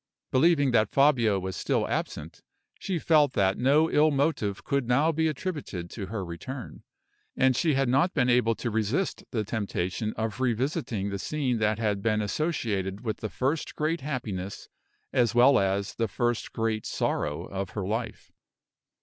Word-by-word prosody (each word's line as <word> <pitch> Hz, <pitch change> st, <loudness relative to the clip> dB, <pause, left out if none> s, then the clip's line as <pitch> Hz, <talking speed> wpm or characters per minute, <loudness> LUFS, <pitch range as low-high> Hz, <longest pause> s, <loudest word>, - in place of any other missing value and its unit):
Believing 145 Hz, 0 st, +4 dB
that 110 Hz, -2 st, +3 dB
Fabio 125 Hz, -8 st, +3 dB
was 95 Hz, -1 st, -4 dB
still -, -, 0 dB
absent, 75 Hz, +2 st, -4 dB, 0.4 s
she 190 Hz, -3 st, -2 dB
felt 150 Hz, -4 st, +3 dB
that 95 Hz, -1 st, +1 dB
no 145 Hz, +6 st, +4 dB
ill 155 Hz, +1 st, +5 dB
motive 135 Hz, -9 st, 0 dB
could 140 Hz, -3 st, -1 dB
now 140 Hz, +7 st, +3 dB
be 160 Hz, 0 st, +1 dB
attributed 150 Hz, -, -4 dB
to 100 Hz, -4 st, -6 dB
her 100 Hz, -2 st, -4 dB
return; 120 Hz, +10 st, -7 dB, 0.6 s
and 130 Hz, -1 st, +4 dB
she 155 Hz, 0 st, +2 dB
had 135 Hz, -1 st, +2 dB
not 140 Hz, +9 st, +2 dB
been 125 Hz, -, +3 dB
able 120 Hz, -2 st, +3 dB
to 120 Hz, -, -3 dB
resist 110 Hz, -, -1 dB
the 110 Hz, -3 st, -1 dB
temptation 105 Hz, -1 st, -2 dB
of 110 Hz, +1 st, -3 dB
revisiting 120 Hz, -, -1 dB
the 100 Hz, -, -3 dB
scene 130 Hz, -2 st, -1 dB
that 105 Hz, 0 st, +1 dB
had 105 Hz, -3 st, -1 dB
been 110 Hz, 0 st, +1 dB
associated 105 Hz, -, -2 dB
with 110 Hz, -3 st, -3 dB
the 110 Hz, -, -5 dB
first 140 Hz, +8 st, -2 dB
great 155 Hz, +2 st, -1 dB
happiness 110 Hz, -9 st, -5 dB, 0.4 s
as 120 Hz, -3 st, +2 dB
well 125 Hz, +3 st, +6 dB
as 100 Hz, +1 st, 0 dB
with -, -, -21 dB
the 115 Hz, -, +1 dB
first 120 Hz, +3 st, -1 dB
great 110 Hz, -1 st, -2 dB
sorrow 75 Hz, +4 st, -1 dB
of 95 Hz, -1 st, -4 dB
her 100 Hz, -, -1 dB
life. 110 Hz, +4 st, -4 dB
115 Hz, 165 wpm, -27 LUFS, 100-140 Hz, 0.6 s, well